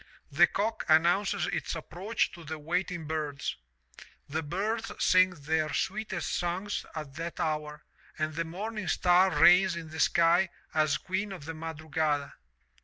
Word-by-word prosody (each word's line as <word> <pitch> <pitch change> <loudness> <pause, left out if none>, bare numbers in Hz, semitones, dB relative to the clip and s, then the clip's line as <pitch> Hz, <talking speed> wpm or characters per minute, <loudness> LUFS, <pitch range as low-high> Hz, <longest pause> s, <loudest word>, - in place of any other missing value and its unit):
The - - +6
cock 220 +3 -2
announces 175 +6 +3
its - - -3
approach 185 +7 -2
to 170 - -11
the 160 0 -5
waiting 170 +2 -2
birds. 150 -2 -3 0.7
The 155 +3 -2
birds 210 +9 -2
sing 185 0 +5
their 155 -2 -1
sweetest 195 -3 -2
songs 180 +4 -2
at 155 -3 -6
that 170 +1 -5
hour 150 -1 -2 0.3
and 155 0 -1
the 165 +2 -1
morning 205 +5 -5
star 180 +1 +4
reiigns 180 +3 +5
in 165 -2 -7
the 160 - -7
sky 170 +2 +4 0.2
as 155 -2 +2
queen 190 +2 -3
of 180 -7 -8
the 165 - -5
madrugada. 155 -2 -2
165 Hz, 145 wpm, -29 LUFS, 155-190 Hz, 0.7 s, The